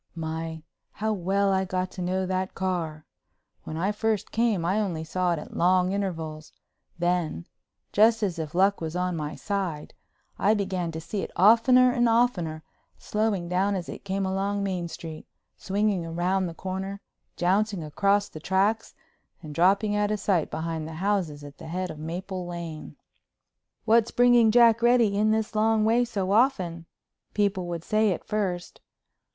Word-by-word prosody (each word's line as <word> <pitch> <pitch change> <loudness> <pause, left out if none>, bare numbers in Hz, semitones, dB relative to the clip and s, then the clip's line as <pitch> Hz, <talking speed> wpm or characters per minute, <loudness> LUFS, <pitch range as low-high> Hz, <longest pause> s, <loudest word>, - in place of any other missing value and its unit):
My, 160 0 -5 0.3
how 220 +1 -1
well 195 +1 +1
I 190 0 +2
got 185 0 -2
to 185 - -7
know 185 +1 -1
that 185 0 -2
car! 165 -5 -3 0.6
When 155 - -5
I 190 +5 0
first 215 0 -1
came 220 -7 +1
I 190 +5 +1
only 175 -7 -2
saw 180 +2 0
it - - -2
at 150 - -9
long 180 +1 +3
intervals. 160 -6 -4 0.5
Then—just 180 - 0
as 180 -4 -1
if 155 0 -5
luck 195 +1 +3
was 160 0 -4
on 180 0 -1
my 150 -1 -4
side—I 195 +2 -3
began 185 -4 -2
to 160 - -4
see 195 +5 -4
it - - -5
oftener 250 +5 +6
and 240 -1 +2
oftener, 180 -10 +1 0.3
slowing 210 -5 -1
down 190 +3 +1
as 180 -3 -4
it - - -8
came 195 0 -2
along 200 +1 -1
Main 185 -3 -2
Street, 165 -1 -8 0.3
swinging 195 -4 -1
round 185 +1 0
the 165 - -9
corner, 190 +2 -5 0.4
jouncing 195 +1 +1
across 200 +6 +1
the 155 - -10
tracks, 195 +6 0 0.5
and 150 -1 -8
dropping 200 +6 +3
out 210 0 +1
of 210 -1 -1
sight 185 -6 +1
behind 160 0 -4
the 160 - -7
houses 175 -5 -1
at 145 -1 -12
the - - -9
head 180 +2 -3
of 155 - -10
Maple 180 +3 -5
Lane. 170 -3 -7 0.9
"What's 230 0 +4
bringing 245 -2 +5
Jack 230 0 +5
Reddy 235 -4 +4
in 210 +1 +2
this 220 0 0
long 215 0 +2
way 235 +2 +3
so 195 -5 -2
often?" 185 -8 +1 0.5
people 195 -3 0
would 170 -1 -4
say 215 +1 +2
at 180 - -4
first. 185 -5 -3
190 Hz, 165 wpm, -26 LUFS, 170-210 Hz, 0.9 s, oftener